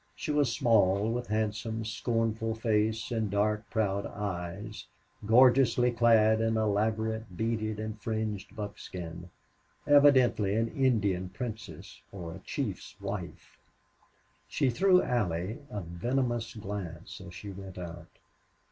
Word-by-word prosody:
She - - -3
was 145 -4 +2
small, 110 -5 +3
with 120 +1 -3
handsome, 110 +1 -2
scornful 115 0 -1
face 110 0 0
and 110 -3 0
dark, 105 +2 0
proud 100 -3 0
eyes, 100 +1 -5 0.4
gorgeously 125 +1 +5
clad 110 -2 +4
in 115 0 +1
elaborate 110 -1 0
beaded 110 -1 -1
and 110 0 -5
fringed 110 -2 -3
buckskin 90 -5 -7 0.6
evidently 130 -8 +5
an 115 +1 +1
Indian 105 -9 +1
princess 110 +1 -7
or 85 -4 -7
a - - -9
chief's - - -5
wife. - - -6 0.9
She 135 -3 +1
threw 185 +7 +4
Allie 95 -3 -1
a 105 - -4
venomous 120 +7 -2
glance 95 -5 -6
as 95 -2 -11
she 100 +3 -7
went 95 -1 -9
out. 85 -2 -7
110 Hz, 120 wpm, -30 LUFS, 100-115 Hz, 0.9 s, gorgeously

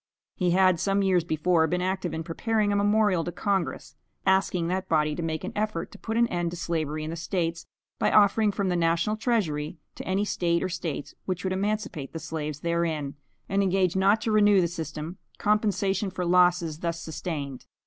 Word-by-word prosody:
He 180 -2 0
had 185 -1 +4
some 195 +2 +1
years 185 -3 +3
before 160 +1 +2
been 180 +3 0
active 185 0 -1
in 160 +1 -3
preparing 210 +5 0
a - - +1
memorial 205 -3 +3
to 175 - -4
Congress, 185 -5 -2 0.3
asking 190 -3 +2
that 185 +1 -2
body 150 -1 +2
to 160 - -4
make 160 0 -3
an 190 - -4
effort 215 +1 -2
to - - -13
put 225 0 -3
an 235 0 +4
end 175 -1 -1
to 175 - -7
slavery 155 -3 -2
in 155 - -4
the - - -4
States, 170 -1 -2 0.3
by - - +3
offering 210 +1 +5
from 195 -1 -1
the 180 - +1
national 170 +4 +1
treasury, 180 - -1 0.2
to - - -8
any 195 +2 +1
State 170 -4 0
or - - -1
States 160 -5 -4
which 185 -1 -3
would 185 -1 0
emancipate 200 -7 -2
the 165 - -4
slaves 155 -2 -5
therein, 165 -4 -1 0.3
and 195 +1 +1
engage 190 -2 +2
not 195 +3 +4
to 225 - -1
renew 205 -2 +5
the 175 - +3
system, 160 0 -6 0.2
compensation 205 -1 +1
for 185 -1 -3
losses 175 -3 +3
thus 170 -1 -2
sustained. 150 -5 -5
180 Hz, 195 wpm, -27 LUFS, 165-195 Hz, 0.3 s, offering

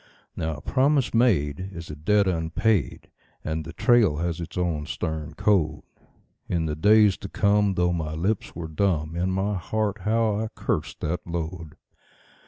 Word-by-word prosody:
Now 80 -1 -2
a 75 - -10
promise 135 - +2
made 95 - +2
is 85 -2 -8
a - - -6
debt 100 +7 +2
unpaid, 85 - 0 0.3
and 80 0 -2
the 80 - -8
trail 105 -3 +3
has 85 +1 -2
its 85 +1 -7
own 80 -4 -1
stern 80 -3 -4
code. 80 -6 +1 0.7
In 85 -2 0
the 75 -1 -2
days 105 +3 +5
to 100 - -8
come, 100 -1 +2
though 90 0 +2
my 80 -2 -3
lips 95 +6 -2
were 80 -1 -5
dumb, 80 -2 0
in 90 +2 0
my 95 +2 0
heart 105 +2 -2
how 110 +1 +1
I 110 - -1
cursed 80 -9 -3
that 85 +3 -3
load. 80 -2 -5
90 Hz, 165 wpm, -25 LUFS, 80-105 Hz, 0.7 s, days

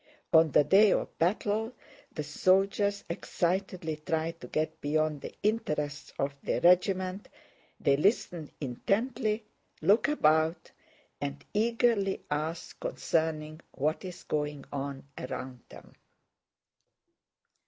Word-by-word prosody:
On 160 0 +7
the 150 - +5
day 195 +7 +6
of - - -2
battle 210 +6 +1 0.4
the 150 - -4
soldiers 195 +6 +2
excitedly 175 -1 -2
try 160 +1 -1
to 165 - -12
get 155 +1 -2
beyond 155 0 0
the - - -8
interests 150 -9 -1
of 140 +1 -1
their - - 0
regiment, 185 +2 +3 0.5
they 140 - +3
listen 170 - +1
intently, 215 - -1 0.3
look 215 +5 +4
about, 160 - +2 0.5
and 70 0 -4
eagerly 225 -2 +2
ask 155 +3 -3
concerning 155 -1 -1
what 155 +6 -1
is 180 -2 -8
going 150 -2 -2
on 140 -1 -4 0.2
around 130 0 -5
them. - - -14
165 Hz, 110 wpm, -30 LUFS, 150-200 Hz, 0.5 s, On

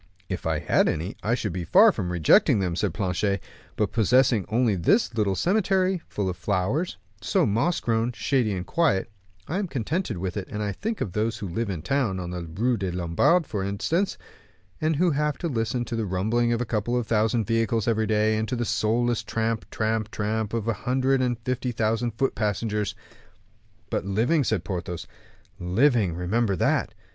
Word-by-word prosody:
"If 95 -2 -3
I 80 -1 +1
had - - +2
any, 85 +6 -3
I 115 +3 +1
should 105 -7 -3
be 90 -1 -3
far 205 - +6
from 95 - -3
rejecting 85 +4 +4
them," 90 -3 -1
said 100 +1 0
Planchet; 100 +1 -1 0.4
"but 105 - 0
possessing 120 -1 +3
only 115 -1 +2
this 120 - +2
little 105 -4 +1
cemetery, 190 - +1
full 100 -2 -2
of 90 -2 -3
flowers, 100 - -1 0.2
so - - +2
moss 115 - +1
grown, 115 +1 0
shady, 120 0 +1
and 90 -1 -4
quiet, 150 - +1 0.4
I 180 - -1
am 200 - -2
contented 140 - -2
with 90 +1 -3
it, 95 - -4
and 105 0 -4
I 105 - -1
think 220 - -4
of 95 - -2
those 110 +3 -1
who 105 -3 -5
live 105 +5 -2
in 85 -5 -4
town, 115 -5 0
in 90 -1 -5
the 90 0 -4
Rue 105 +10 -1
des 95 -2 -2
Lombards, 90 - +2
for 100 -4 -3
instance, 140 - -1 0.6
and 155 0 +1
who 175 +3 +3
have 150 -1 0
to 170 - -3
listen 120 -3 -1
to 115 - -4
the 110 -2 -2
rumbling 110 +6 +1
of 120 0 0
a - - 0
couple 115 +2 -1
of 120 - -1
thousand 110 0 +1
vehicles 115 +1 0
every 110 -1 +1
day, 110 0 +2
and 110 +1 -1
to 125 - -2
the 120 0 -1
soulless 120 +2 +1
tramp, 115 0 -2
tramp, 110 -1 -1
tramp 110 +1 -2
of 115 -1 -2
a 115 - +2
hundred 130 +5 +1
and 125 -2 0
fifty 125 +1 -2
thousand 115 0 -1
foot 135 - +1
passengers." 105 -1 -1 1.0
"But - - 0
living," 115 - +1
said 110 -6 0
Porthos; 90 -1 -4 0.5
"living, 100 - +2
remember 100 +4 0
that." - - 0
110 Hz, 190 wpm, -25 LUFS, 95-125 Hz, 1.0 s, far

